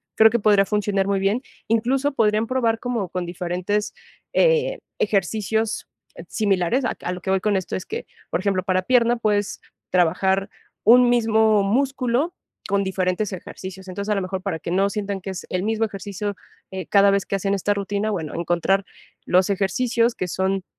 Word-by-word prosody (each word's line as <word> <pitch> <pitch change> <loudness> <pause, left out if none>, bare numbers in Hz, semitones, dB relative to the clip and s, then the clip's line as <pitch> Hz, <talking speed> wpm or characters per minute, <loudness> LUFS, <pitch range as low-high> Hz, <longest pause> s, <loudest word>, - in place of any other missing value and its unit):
Creo 220 0 +7
que 235 - +1
podría 205 -2 +4
funcionar 205 -1 0
muy 200 -1 +1
bien. 200 +7 0 0.2
Incluso, 255 +6 +1
podrían 215 -2 +2
probar 230 -3 +1
como 235 -6 -2
con 180 -1 -3
diferentes, 180 +4 -2 0.4
eh, - - +3 0.2
ejercicios 215 +3 0 0.4
similares, 205 +4 +1
a - - -1
a 180 - -2
lo 180 0 -6
que - - -5
voy 190 0 +3
con 205 +1 +1
esto 190 -2 -2
es 185 - -5
que, 450 +3 -6 0.2
por - - 0
ejemplo, 190 -1 0
para 185 -1 +1
pierna 240 +3 +3
pues 205 -3 0 0.3
trabajar 190 +2 +2 0.3
un 245 +3 +7
mismo 220 -3 +3
músculo 265 - 0 0.3
con 200 0 +1
diferentes 190 +2 -1
ejercicios. 190 0 -8
Entonces, 200 +3 -4
a - - +2
lo 195 - 0
mejor, 185 0 -4
para 190 -4 -2
que 170 - -5
no 195 +2 +2
sientan 200 -2 -3
que 195 - -6
es 190 - -7
el 185 - -1
mismo 225 +1 +1
ejercicio, 200 0 -5 0.4
eh, 190 -3 -5
cada 200 -1 +5
vez 200 -1 +1
que 195 - -1
hacen 195 +1 -1
esta 200 +1 +1
rutina, 200 +1 -2
bueno, 160 -6 -4
encontrar 175 +3 +1 0.4
los 185 +2 +3
ejercicios 230 +5 +1
que 185 - -3
son 190 +1 -1
200 Hz, 180 wpm, -23 LUFS, 190-225 Hz, 0.4 s, Creo